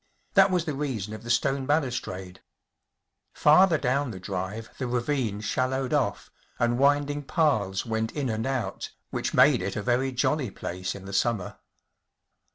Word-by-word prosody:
That 195 0 +6
was 180 -3 +1
the 155 - -2
reason 125 -8 -3
of 110 - -7
the 120 - -9
stone 135 +2 +1
balustrade. 120 - -2 0.9
Farther 160 +3 +5
down 140 0 0
the 95 -5 -7
drive 95 +4 -5
the 130 - -2
ravine 120 -3 -1
shallowed 130 +3 -1
off, - - -1 0.3
and 120 +1 +1
winding 145 +1 +2
paths 110 - +1
went 110 -1 -1
in 145 -3 -2
and 110 +1 -2
out, 120 -8 -3 0.2
which - - -2
rnade - - +6
it 95 +2 -3
a 105 - -3
very 125 +3 +1
jolly 130 +1 0
place 90 -1 -5
in 95 -1 -10
the 95 - -8
summer. 100 -1 -1
120 Hz, 160 wpm, -27 LUFS, 105-140 Hz, 0.9 s, That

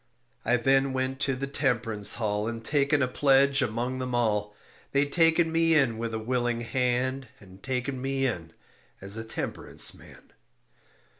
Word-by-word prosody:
I 125 +2 +2
then 135 +2 +2
went 130 0 -2
to 135 -1 0
the 135 +2 -3
Temperance 120 -7 +1
hall 105 -2 -1
And 115 -1 -5
taken 145 -1 +2
a - - +1
pledge 140 +1 +3
among 125 +2 -2
them 125 -1 -3
all. 105 -3 0 0.4
They 140 +1 +3
taken 165 +2 +3
me 165 0 +3
in 125 -7 +2
with 115 0 -3
a - - -1
willing 120 +1 -1
hand 130 +2 -1
And 95 -1 -16
taken 130 +1 -3
me 135 0 -1
in 85 -10 -3 0.5
as 100 +2 0
a 110 - -3
temperance 110 - -2
man. - - -17
125 Hz, 160 wpm, -27 LUFS, 115-135 Hz, 0.5 s, pledge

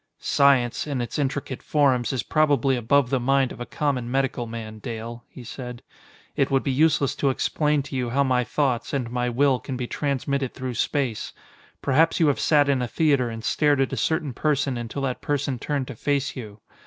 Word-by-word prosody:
"Science, 135 -2 +2
in 140 -3 -2
its 120 +5 -3
intricate 135 -2 -2
forms, 135 -5 +2
is 130 -3 -2
probably 145 -4 +2
above 125 +2 +2
the 135 - +2
mind 135 +1 +2
of - - -9
a 120 - -5
common 135 -5 -1
medical 130 -2 -1
man, 110 -1 -7
Dale," 115 0 -6
he 125 - -11
said. 125 0 -8 0.5
"It 140 - +1
would 135 -1 +2
be 135 - 0
useless 145 0 +3
to 140 - +2
explain 150 +2 +1
to 135 - -8
you 125 -2 -1
how 140 +4 +2
my 125 -2 +2
thoughts 130 -1 -1
and 125 -4 -2
my 125 0 0
will 130 +1 +2
can 130 +3 -5
be 125 - -3
transmitted 140 0 -2
through 130 -1 -4
space. 120 -1 -1 0.5
Perhaps 155 +6 +3
you 160 -3 +4
have 140 - 0
sat 145 -2 +4
in 135 -2 +2
a 125 - -1
theater 140 -3 +2
and 115 -1 -7
stared 145 +1 +2
at 135 0 +1
a - - 0
certain 150 +2 -1
person 140 -1 0
until 120 +3 -4
that 130 -2 -2
person 140 -3 -1
turned 140 -1 -2
to 135 - -8
face 145 +4 -1
you. 105 -5 -9
135 Hz, 205 wpm, -24 LUFS, 120-140 Hz, 0.5 s, you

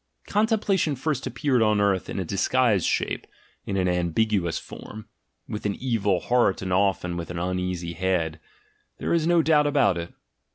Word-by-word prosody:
Contemplation 205 -7 +1
first 135 0 -2
appeared 135 -6 +1
on 105 -1 +3
earth 100 -2 +1
in - - -4
a 95 - -2
disguised 105 +2 +2
shape, - - -1 0.4
in 100 - -1
an 90 -1 +1
ambiguous 90 +1 0
form, 110 0 -10 0.4
with 105 - -5
an 100 - -2
evil 105 -7 0
heart 120 -7 +2
and 95 -1 -2
often 95 -2 +1
with 85 - -5
an 90 - -5
uneasy 90 -1 -2
head: 85 -3 -1 0.6
there - - -1
is 165 -1 +2
no 170 -1 +4
doubt 150 -2 +4
about 140 - +2
it. 85 0 -6
100 Hz, 165 wpm, -25 LUFS, 90-130 Hz, 0.6 s, no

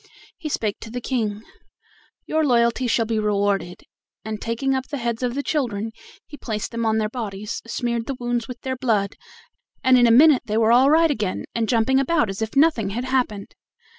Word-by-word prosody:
He 320 -4 -5
spake 215 -7 -2
to 225 - -9
the 245 +2 -4
King: 220 -4 -2 0.8
"Your 315 0 0
loyalty 240 -2 +2
shall 230 -1 +1
be 220 -1 -1
rewarded," 200 -3 -1 0.4
and 215 -1 -5
taking 235 +4 -1
up 265 0 -2
the 290 - -4
heads 235 -2 -3
of 245 -1 -1
the 285 - -2
children, 225 -9 -2 0.3
he 290 - -11
placed 215 -5 -4
them 230 -1 -2
on 220 0 +2
their 215 -1 +1
bodies, 215 -2 -5
smeared 235 -1 -2
the 275 - -3
wounds 240 -1 -2
with 250 -2 -9
their 260 0 -3
blood, 215 -6 0 0.7
and 255 -1 +5
in 240 - +5
a - - +5
minute 280 +3 +6
they 215 0 -1
were 225 0 +3
all 255 +3 +6
right 320 +1 +4
again 210 -8 -2
and 225 -2 -1
jumping 245 +3 +3
about 275 -5 +1
as 195 - -7
if 220 +3 -3
nothing 275 -8 +3
had 240 +5 -3
happened. 245 -6 -1
235 Hz, 200 wpm, -22 LUFS, 215-260 Hz, 0.8 s, minute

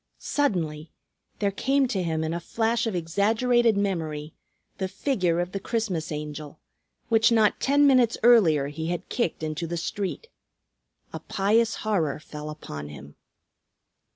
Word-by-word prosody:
Suddenly, 165 - -1 0.5
there 200 -1 0
came 270 +6 +1
to 195 -7 -1
him 160 -2 -1
in 160 +1 -2
a 170 - -2
flash 225 +6 0
of 215 - -2
exaggerated 220 +6 +2
memory 160 -6 -2 0.5
the 190 - -1
figure 185 -4 0
of 175 +1 -2
the 195 - -3
Christmas 190 -8 -2
Angel 150 0 -6 0.5
which 225 0 +4
not 220 -2 +3
ten 285 +1 +3
minutes 255 -4 +4
earlier 165 -13 +5
he 160 +2 -5
had 175 +1 -4
kicked 180 -9 -2
into 155 +2 -3
the 170 +1 -3
street. 195 - -4 0.9
A - - -4
pious 215 +3 +1
horror 165 -11 0
fell 150 0 -8
upon 75 - -7
him. 70 0 -11
185 Hz, 145 wpm, -26 LUFS, 155-225 Hz, 0.9 s, earlier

